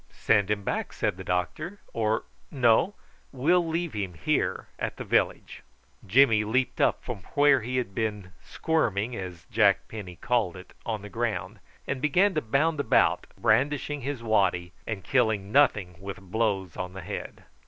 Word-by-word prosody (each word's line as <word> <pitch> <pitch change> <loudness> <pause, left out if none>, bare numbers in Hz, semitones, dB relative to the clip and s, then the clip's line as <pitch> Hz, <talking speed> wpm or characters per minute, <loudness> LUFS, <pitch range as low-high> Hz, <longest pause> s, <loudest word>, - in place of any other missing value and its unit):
"Send 100 -1 +2
him 105 -1 0
back," - - -2
said - - -1
the 95 - -8
doctor; 125 - -2
"or, 110 -1 0 0.3
no: 130 - +3 0.4
we'll 165 +7 +2
leave 165 0 -2
him 100 -4 -4
here 75 - 0
at - - -3
the - - -5
village." - - 0 0.5
Jimmy 115 0 +5
leaped 125 +4 0
up - - +2
from 120 -5 -5 0.2
where 145 -2 +5
he 125 +4 -3
had 120 -6 -2
been 105 -4 -3
squirming, 120 - -1
as 90 -5 -7
Jack - - +3
Penny 100 -5 -8
called 110 -4 0
it, 90 - -13
on 110 -3 -2
the 105 - -8
ground, 115 0 -3 0.3
and 130 - -3
began 180 +7 +3
to 155 - 0
bound 145 +7 +1
about, 140 - +3
brandishing 145 +5 +1
his 135 -2 -4
waddy, 95 -5 +1
and 105 -4 -4
killing 110 -7 +1
nothing 105 -10 +3
with 100 0 -6
blows 95 -2 -1
on 90 0 -5
the 95 - -7
head. - - -6
110 Hz, 165 wpm, -27 LUFS, 95-140 Hz, 0.5 s, Jimmy